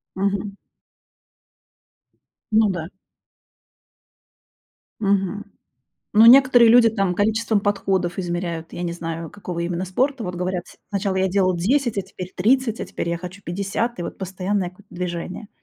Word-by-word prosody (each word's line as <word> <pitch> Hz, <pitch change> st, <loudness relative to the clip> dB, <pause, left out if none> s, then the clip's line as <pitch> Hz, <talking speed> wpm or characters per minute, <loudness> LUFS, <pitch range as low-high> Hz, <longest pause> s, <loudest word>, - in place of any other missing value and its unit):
Мгм. 200 Hz, +1 st, -2 dB, 2.0 s
Ну 215 Hz, -1 st, +5 dB
да. 170 Hz, -4 st, -3 dB, 2.1 s
Мгм. 200 Hz, 0 st, 0 dB, 0.7 s
Ну 220 Hz, +2 st, +7 dB
некоторые 250 Hz, -2 st, +8 dB
люди 230 Hz, -1 st, +7 dB
там 195 Hz, -4 st, 0 dB
количеством 220 Hz, +2 st, +1 dB
подходов 195 Hz, -3 st, 0 dB
измеряют. 175 Hz, -2 st, -3 dB
Я 175 Hz, -, -5 dB
не 170 Hz, -1 st, -2 dB
знаю, 165 Hz, -1 st, -5 dB
какого 180 Hz, -4 st, -6 dB
именно 175 Hz, +1 st, -2 dB
спорта. 255 Hz, +6 st, 0 dB
Вот 180 Hz, -1 st, -4 dB
говорят, 180 Hz, 0 st, -2 dB
с -, -, -16 dB
сначала 200 Hz, -1 st, -1 dB
я 190 Hz, 0 st, +2 dB
делал 185 Hz, -1 st, +2 dB
10, 240 Hz, +5 st, +1 dB
а -, -, +2 dB
теперь 185 Hz, -1 st, -9 dB
30, 230 Hz, +3 st, +2 dB
а -, -, -3 dB
теперь 170 Hz, -, -4 dB
я 170 Hz, -, -1 dB
хочу 180 Hz, +3 st, -9 dB
50, 200 Hz, +5 st, -2 dB
и -, -, -3 dB
вот -, -, -6 dB
постоянное 190 Hz, 0 st, -2 dB
какое-то 185 Hz, +2 st, -20 dB
движение. 180 Hz, +3 st, -5 dB
190 Hz, 140 wpm, -22 LUFS, 180-215 Hz, 2.1 s, некоторые